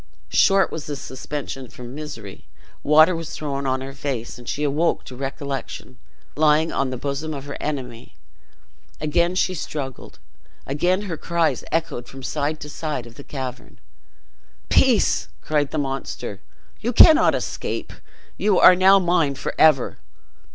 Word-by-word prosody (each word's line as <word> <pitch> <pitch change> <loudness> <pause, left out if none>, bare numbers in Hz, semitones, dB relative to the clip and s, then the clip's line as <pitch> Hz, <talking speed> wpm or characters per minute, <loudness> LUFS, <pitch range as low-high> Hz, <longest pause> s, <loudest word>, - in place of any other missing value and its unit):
Short 195 -1 +4
was 160 - -6
this 145 -2 -4
suspension 135 -1 -6
from 120 +1 -10
misery; 115 -10 -8 0.3
water 155 +4 +5
was 165 -1 -5
thrown 140 -2 -3
on 130 0 0
her 135 +1 -7
face, 135 -5 -4
and 120 - -9
she 150 - -2
awoke 150 +4 +1
to 125 - -10
recollection, 135 -1 -5 0.4
lying 155 +1 +3
on 135 - 0
the 130 - -4
bosom 145 +4 -3
of 140 0 -7
her 140 - -6
enemy. 125 -6 -5 0.8
Again 170 +4 +1
she 185 0 +1
struggled, 140 -6 -6 0.5
again 180 +8 0
her 175 -6 -4
cries 170 0 0
echoed 160 -7 -2
from 135 0 -11
side 150 +3 -2
to 150 - -6
side 150 -4 -4
of 120 - -12
the 140 - -12
cavern. 130 -3 -7 0.9
"Peace!" - - +3
cried 145 -2 0
the - - -4
monster; 135 -2 -4 0.4
"you 240 +3 -2
cannot 320 +6 +7
escape; - - -4 0.4
you 205 -3 +2
are 185 - +9
now 190 +2 +6
mine 170 -6 +2
forever! 145 -1 +2
145 Hz, 145 wpm, -22 LUFS, 135-160 Hz, 0.9 s, are